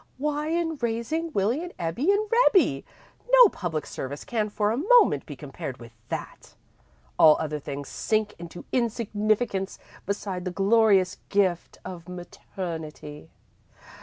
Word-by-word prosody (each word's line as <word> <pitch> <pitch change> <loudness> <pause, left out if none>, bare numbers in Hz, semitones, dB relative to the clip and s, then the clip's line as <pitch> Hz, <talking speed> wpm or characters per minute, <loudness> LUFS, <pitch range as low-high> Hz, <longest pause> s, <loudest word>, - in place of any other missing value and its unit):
"Why, 300 +2 -1
in 325 -1 -1
raising 235 +9 -2
Willie 225 +6 0
and 355 0 -7
Ebbie 180 - 0
and 420 +1 +1 0.2
Rebbie! 250 - +3 0.5
No - - +9
public 165 - -4
service 140 +2 -6
can 215 -3 -1
for 210 0 0
a - - 0
moment 405 - +4
be 145 - -7
compared 135 -2 -7
with 120 -2 -12 0.2
that! - - -7 0.6
All 155 -1 +8
other 150 -1 -3
things 140 0 -6
sink 215 -1 -1
into 170 0 -9
insignificance 215 -4 0 0.3
beside 195 -2 -3
the 185 - -2
glorious 195 0 +3
gift 190 -4 0
of 175 -1 -8
maternity. 165 -4 -7
200 Hz, 135 wpm, -26 LUFS, 165-245 Hz, 0.6 s, No